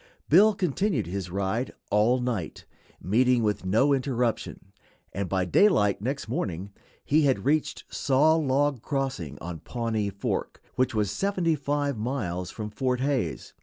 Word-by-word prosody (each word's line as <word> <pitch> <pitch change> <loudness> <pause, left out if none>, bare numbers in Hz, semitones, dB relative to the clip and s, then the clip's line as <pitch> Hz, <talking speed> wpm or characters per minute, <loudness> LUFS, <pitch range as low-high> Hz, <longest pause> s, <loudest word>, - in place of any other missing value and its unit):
Bill 205 +7 +6
continued 180 - 0
his 90 0 -4
ride 100 +7 -2 0.2
all 110 +5 +3
night, 120 -9 -3 0.3
meeting 120 +5 +2
with 105 -3 -1
no 125 +9 +3
interruption, 125 -7 -2 0.4
and 100 -1 -3
by 95 -1 0
daylight 105 - +3
next 135 +4 -3
morning 100 -4 -3 0.3
he 155 +2 +3
had 135 -2 +1
reached 150 +2 0
Saw 140 +3 +3
Log 145 -3 +1
Crossing, 135 - -3
on 85 -1 -6
Pawnee 110 - -2
Fork, 100 0 -3
which 130 -1 0
was 105 -2 +1
seventy 185 - 0
five 145 -3 -1
miles 100 -8 -3
from 105 +1 -6
Fort 125 +2 -1
Hays. 135 -1 -2
125 Hz, 140 wpm, -27 LUFS, 100-140 Hz, 0.4 s, Bill